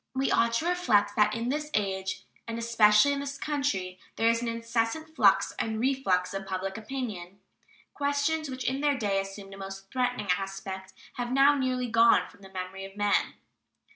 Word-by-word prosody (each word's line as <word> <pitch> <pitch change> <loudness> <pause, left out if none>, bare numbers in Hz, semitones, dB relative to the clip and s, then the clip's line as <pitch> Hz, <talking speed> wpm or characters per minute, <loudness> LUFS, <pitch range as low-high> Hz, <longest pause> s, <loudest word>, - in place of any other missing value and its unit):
We 265 +1 +1
ought 230 0 +3
to 270 +8 0
reflect 255 -14 +2
that 210 -1 +3
in 230 +2 -2
this 300 +2 -2
age, 190 -2 -1 0.2
and 230 0 -4
especially 230 +2 +5
in 280 - -2
this 280 0 -5
country, 210 -13 -2 0.2
there 225 - +3
is 230 0 +1
an 240 - -3
incessant 230 +7 -2
flux - - +4
and 220 -1 -1
reflux 230 -9 +1
of 195 0 -5
public 190 0 -3
opinion. 215 -6 -6 0.5
Questions 285 +2 0
which 260 0 -5
in 265 +2 -1
their 290 -2 +2
day 200 -4 +1
assumed 195 0 -9
a - - -10
most 195 0 -8
threatening 250 -5 -1
aspect 195 -1 -6 0.2
have 245 0 -3
now 275 +2 +6
nearly 255 -2 0
gone 230 0 +5
from 200 - -20
the 195 - -12
memory 190 0 -6
of 195 +1 -10
men. 205 -1 +1
230 Hz, 180 wpm, -28 LUFS, 195-265 Hz, 0.5 s, now